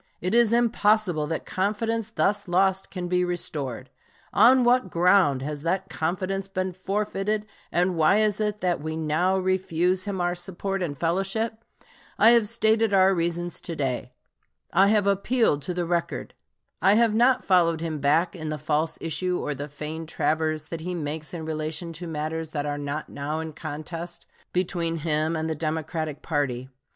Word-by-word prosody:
It 180 +3 -2
is 235 -2 +5
impossible 215 -8 +2
that 160 +1 -3
confidence 215 +3 -1
thus 205 -2 0
lost 190 +2 +2
can 180 -2 -4
be 180 0 +2
restored. 140 -8 -3 0.4
On 255 +1 +6
what 240 -4 +3
ground 170 -6 +3
has 150 0 -4
that 190 +4 -1
confidence 185 +4 -2
been 185 -1 -2
forfeited, 205 +2 -2 0.3
and 180 +1 +1
why 165 +6 +4
is 215 -1 +1
it 210 0 -1
that 175 -4 0
we 160 +1 -4
now 160 +4 +1
refuse 185 -1 +1
him 200 -2 -3
our 175 0 +1
support 190 +2 -3
and 150 -6 -3
fellowship? 195 - -1 0.5
I 225 - +7
have 230 -3 +4
stated 220 -2 +2
our 190 0 +5
reasons 175 0 -2
to 170 - -5
day. 130 -4 -2 0.6
I 195 +3 +5
have 210 -1 +3
appealed 200 - +2
to 180 - -3
the 175 -1 -1
record. 170 0 -2 0.5
I 195 +4 +5
have 230 -1 +4
not 245 +3 +4
followed 170 -4 +3
him 160 -2 -3
back 155 +6 +2
in 155 -3 -5
the 155 - -2
false 155 +2 -1
issue 180 +2 -1
or 150 - -2
the 145 +1 -6
feigned 155 +2 -6
traverse 155 0 0
that 165 -1 -5
he 180 +2 -3
makes 155 -1 -4
in 165 -3 -5
relation 160 +2 -3
to 170 +2 -7
matters 160 0 -3
that 150 -2 -3
are 145 0 -2
not 145 +2 -4
now 150 +3 -3
in 160 -1 -5
contest 165 +3 -6 0.3
between 175 -2 -1
him 155 0 0
and 160 0 -2
the 160 - -1
Democratic 155 -1 -3
party. 130 -5 -1
175 Hz, 170 wpm, -25 LUFS, 155-195 Hz, 0.6 s, I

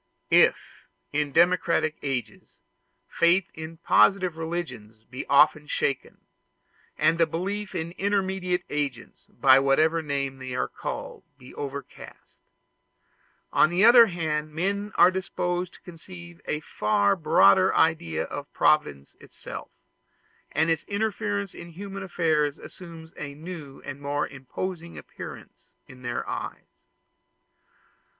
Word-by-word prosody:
If - - +6 0.6
in 150 -1 0
democratic 170 -1 +2
ages 135 -4 -5 0.5
faith 175 +2 +2
in 160 +1 -8
positive 175 - +3
religions 130 -10 -6
be 130 - -8
often 150 +1 +4
shaken, 140 -2 -3 0.7
and 165 +1 +2
the 165 - +4
belief 195 +5 -4
in 165 -1 -3
intermediate 190 -2 0
agents, 140 -5 -4
by 130 0 +5
whatever 155 +5 +3
name 140 -3 -3
they 130 -1 -6
are - - 0
called, - - -6
be 125 - -14
overcast; 140 0 -9 1.1
on - - +5
the 180 +4 +3
other 235 0 +9
hand 155 -4 -2
men 200 +4 -1
are 175 +2 +6
disposed 180 -1 -3
to - - -17
conceive 175 0 -12
a 150 - -2
far 100 -6 +1
broader 100 - +5
idea 165 +1 +1
of 145 0 -7
Providence 70 - +1
itself, - - -9 0.8
and 160 +2 +2
its 160 - 0
interference 205 -1 -2
in 170 - -10
human 195 +2 -7
affairs 160 -6 0
assumes 165 -2 -12
a 140 -1 -6
new 155 -3 -9
and 140 0 -7
more 145 +1 -1
imposing 170 +6 -6
appearance - - -11 0.2
to - - -12
their 120 -1 -5
eyes. - - -7
160 Hz, 120 wpm, -26 LUFS, 140-180 Hz, 1.1 s, other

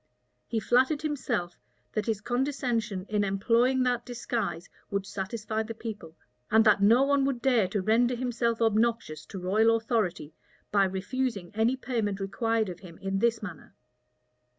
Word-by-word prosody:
He 225 - -1
flattered 260 +7 +2
himself, 245 - -2 0.3
that 215 -2 -2
his 215 -2 -1
condescension 240 -6 -1
in 210 -1 +1
employing 235 +6 +2
that 245 -1 0
disguise 230 -8 -3 0.2
would 200 -1 -2
satisfy 215 +2 -3
the 225 +1 -5
people, 205 -8 -8 0.3
and 220 +1 +5
that 210 -2 +5
no 230 +6 +6
one 280 0 +3
would 270 -3 -1
dare 235 -6 +3
to 195 +1 -2
render 240 +4 +3
himself 235 -2 0
obnoxious 220 -8 0
to 200 - -8
royal 215 +5 +3
authority, 215 - -1 0.4
by 200 -1 +4
refusing 200 +1 -3
any 225 +4 +2
payment 225 -6 -2
required 225 +3 0
of 180 -1 -7
him 170 -4 -12
in 195 0 -2
this 230 0 +1
manner. 175 -7 -9
225 Hz, 150 wpm, -28 LUFS, 195-240 Hz, 0.4 s, no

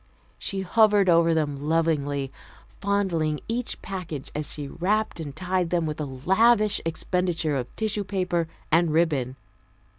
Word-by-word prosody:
She 195 -1 -3
hovered 205 0 +4
over 165 -1 +5
them 150 -3 0
lovingly, 145 -2 0 0.5
fondling 175 -7 0
each 235 +1 -3
package 170 -8 -6
as 150 0 -3
she 145 -2 -5
wrapped 200 +6 -1
and 145 -4 -6
tied 180 +1 0
them 170 -2 +1
with 155 0 -3
a - - -1
lavish 200 - +3
expenditure 165 -2 -1
of 125 -2 -2
tissue 215 -2 -1
paper 180 -4 -1 0.2
and 165 0 +4
ribbon. 150 -6 +1
170 Hz, 140 wpm, -25 LUFS, 150-195 Hz, 0.5 s, over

